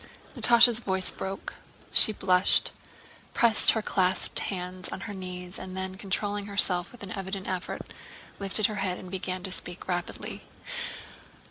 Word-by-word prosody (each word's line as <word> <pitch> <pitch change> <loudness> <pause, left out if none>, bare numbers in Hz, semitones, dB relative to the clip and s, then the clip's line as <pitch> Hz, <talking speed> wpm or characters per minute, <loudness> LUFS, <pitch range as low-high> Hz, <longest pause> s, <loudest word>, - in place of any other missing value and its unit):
Natásha's 235 -1 +7
voice 190 -4 0
broke. 195 0 -7 0.3
She - - +9
blushed, 185 -2 +3 0.6
pressed 230 -3 +6
her 220 - -2
clasped 185 -2 0
hands 185 -1 -5
on - - -7
her 225 -2 -6
knees, 180 -1 -7
and 185 0 -8
then 190 0 -4
controlling 200 +1 -3
herself 180 -3 0
with 245 - -13
an 195 - -7
evident 195 -2 -5
effort 185 -1 -5 0.5
lifted 200 +2 +1
her 215 -2 -1
head 185 -2 -2
and 185 - -11
began 185 -1 -4
to 190 - -1
speak 180 -1 -7
rapidly. 175 -1 -4
190 Hz, 145 wpm, -27 LUFS, 185-205 Hz, 0.6 s, She